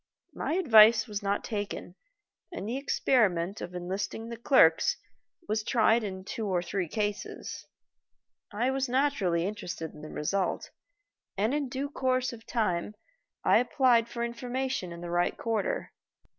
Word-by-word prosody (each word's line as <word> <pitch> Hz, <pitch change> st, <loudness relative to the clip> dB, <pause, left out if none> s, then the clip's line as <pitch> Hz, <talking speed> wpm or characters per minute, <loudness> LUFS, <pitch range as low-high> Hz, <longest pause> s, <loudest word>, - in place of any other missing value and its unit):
My -, -, -2 dB
advice 230 Hz, -, +7 dB
was 210 Hz, -3 st, -5 dB
not 200 Hz, 0 st, -1 dB
taken 205 Hz, -5 st, -4 dB, 0.6 s
and 345 Hz, -, -5 dB
the 235 Hz, -, -2 dB
experiment 205 Hz, -9 st, +1 dB
of 180 Hz, -, -6 dB
enlisting 195 Hz, +5 st, -4 dB
the 235 Hz, -, -5 dB
clerks 230 Hz, -, +4 dB, 0.5 s
was 215 Hz, 0 st, 0 dB
tried 225 Hz, 0 st, +3 dB
in 190 Hz, -2 st, -5 dB
two 215 Hz, +2 st, -4 dB
or 180 Hz, -3 st, 0 dB
three 180 Hz, 0 st, -2 dB
cases. 205 Hz, +3 st, -4 dB, 0.8 s
I 235 Hz, +5 st, 0 dB
was 265 Hz, -1 st, -1 dB
naturally 240 Hz, -11 st, +1 dB
interested 180 Hz, -6 st, -5 dB
in -, -, -12 dB
the 155 Hz, -, -8 dB
result, 190 Hz, +5 st, -2 dB, 0.7 s
and 215 Hz, +6 st, +1 dB
in 290 Hz, -3 st, -1 dB
due 270 Hz, +2 st, -3 dB
course 255 Hz, -2 st, 0 dB
of 225 Hz, -1 st, -12 dB
time 210 Hz, -3 st, -1 dB, 0.5 s
I -, -, +5 dB
applied 245 Hz, -2 st, +3 dB
for 235 Hz, 0 st, -3 dB
information 245 Hz, -3 st, -3 dB
in 170 Hz, 0 st, -8 dB
the 175 Hz, 0 st, -6 dB
right 175 Hz, 0 st, +1 dB
quarter. 235 Hz, -, -2 dB
220 Hz, 145 wpm, -29 LUFS, 185-250 Hz, 0.8 s, advice